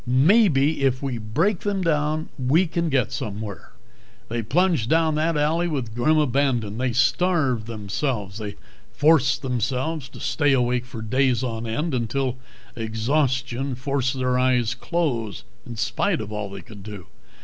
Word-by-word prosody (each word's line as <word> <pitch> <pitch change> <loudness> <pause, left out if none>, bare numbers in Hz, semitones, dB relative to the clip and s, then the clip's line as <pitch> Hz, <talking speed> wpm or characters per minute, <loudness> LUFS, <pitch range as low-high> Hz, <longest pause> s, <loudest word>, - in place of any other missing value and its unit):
Maybe 150 - +4
if 130 -1 +1
we 130 -4 -2
break 160 - 0
them 200 -2 -1
down 155 -1 0
we 140 +8 +3
can 170 0 -1
get 130 -6 +1
somewhere." 105 -1 -6 0.6
They 115 +1 -1
plunged 155 - +1
down 160 -1 +3
that 155 +1 +1
alley 160 +4 +1
with 130 -9 -3
grim 155 +7 +2
abandon. 130 -7 +1
They 130 -1 +1
starved 135 -3 +2
themselves. 105 -1 -3
They 105 -1 -5 0.4
forced 145 -5 +3
themselves 130 +3 -2
to - - -12
stay 145 -3 +1
awake 125 -1 +1
for 120 -3 -7
days 130 +2 +1
on 115 -2 -3
end, 150 +8 -2
until 130 +2 -1 0.4
exhaustion 125 +3 -1
forced 135 0 -1
their 125 -1 +1
eyes 125 -2 +2
closed 125 - -2 0.2
in 120 - -6
spite 165 - 0
of 105 -1 -6
all 105 -1 -4
they 100 -1 -8
could 100 +2 -12
do. 100 -3 -9
130 Hz, 150 wpm, -24 LUFS, 115-155 Hz, 0.6 s, Maybe